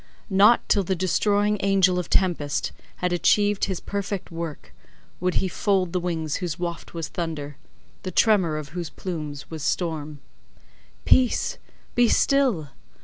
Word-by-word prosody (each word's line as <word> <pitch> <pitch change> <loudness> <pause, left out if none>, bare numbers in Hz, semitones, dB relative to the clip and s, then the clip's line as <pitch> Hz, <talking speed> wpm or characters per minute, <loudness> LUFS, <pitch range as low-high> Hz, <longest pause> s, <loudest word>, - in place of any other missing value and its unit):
Not 205 +5 +5
till 205 - +3
the 190 +1 -1
destroying 205 +3 +1
angel 190 -2 +3
of 180 - -5
tempest 170 -7 +1 0.2
had 180 0 -1
achieved 205 +3 +3
his 190 -3 -3
perfect 200 -2 -4
work, 165 -2 -6 0.5
would 180 0 0
he 190 - +1
fold 185 -1 0
the 180 - +1
wings 160 -4 -2
whose 175 -4 -3
waft 170 -1 -5
was 165 -2 -3
thunder—the 155 +2 -7
tremor 185 -5 +3
of 150 -2 -6
whose 170 0 -5
plumes 150 -6 -6
was 160 -1 -6
storm. 155 -3 -2 0.9
Peace, 255 -2 +3 0.3
be 245 0 +4
still! 255 - +2
180 Hz, 140 wpm, -24 LUFS, 160-200 Hz, 0.9 s, Not